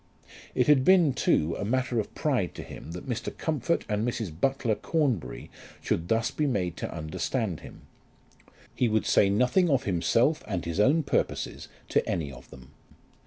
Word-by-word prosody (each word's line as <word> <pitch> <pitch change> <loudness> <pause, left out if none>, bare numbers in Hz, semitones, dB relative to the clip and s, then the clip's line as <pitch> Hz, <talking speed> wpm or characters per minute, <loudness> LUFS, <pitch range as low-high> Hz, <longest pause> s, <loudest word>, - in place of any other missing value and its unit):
It 125 - +3
had 145 -3 +5
been, 175 -4 +5
too, 80 -6 +1
a - - -2
matter 125 +2 0
of 105 - -5
pride 125 - 0
to - - -6
him 80 - -9
that 90 - -8
Mr. 120 -3 -4
Comfort 160 +1 -1
and 105 0 -1
Mrs. 115 -6 -2
Butler 130 - +1
Cornbury 135 - -2 0.3
should 85 +1 -2
thus 115 +4 +1
be 150 - 0
made 90 - -1
to - - -4
understand 85 +5 -3
him. - - -13 0.9
He 120 - +1
would 110 0 +1
say 100 - +4
nothing 125 - +3
of 135 -3 +2
himself 115 - +2
and 90 -5 -3
his 85 +3 -3
own 145 +9 +4
purposes - - -2 0.2
to - - +2
any 75 -5 -2
of 65 -1 -13
them. 65 -1 -14
115 Hz, 170 wpm, -27 LUFS, 90-135 Hz, 0.9 s, had